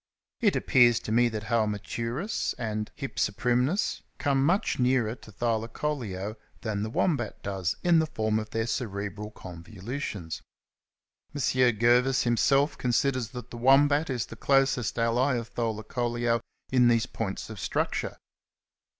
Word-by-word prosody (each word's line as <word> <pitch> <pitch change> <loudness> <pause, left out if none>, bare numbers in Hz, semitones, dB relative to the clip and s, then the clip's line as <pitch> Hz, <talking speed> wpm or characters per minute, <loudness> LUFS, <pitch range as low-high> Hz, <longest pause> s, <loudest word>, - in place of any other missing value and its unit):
It 215 -5 +3
appears 120 -3 +4
to - - -5
me 120 +2 +4
that 110 -2 -4
Halmaturus 115 - -1
and 110 -3 -3
Hypsiprymnus 125 - 0 0.2
come 135 -2 +1
much 175 +2 +1
nearer 125 -3 +2
to 115 -3 -14
Thylacoleo 115 -2 -2 0.2
than 105 -3 -2
the 110 - -2
Wombat 120 - -1
does 95 -4 -2
in 170 -2 +5
the 160 - +1
form 110 -6 0
of 110 - -6
their 115 0 -1
cerebral 105 -3 -3
convolutions. 95 - -6 0.9
M. - - -3
Gervais 125 0 +3
himself 135 +5 +2
considers 125 0 +1
that 125 0 -9
the 120 - -7
Wombat 145 +5 +4
is 125 -3 -1
the - - -10
closest 135 -1 +2
ally 120 +4 +2
of 120 0 -5
Thylacoleo 120 +1 -1 0.3
in 125 -2 +5
these 115 -1 +3
points 110 -3 -5
of 105 - -8
structure. - - -2
120 Hz, 135 wpm, -28 LUFS, 110-130 Hz, 0.9 s, in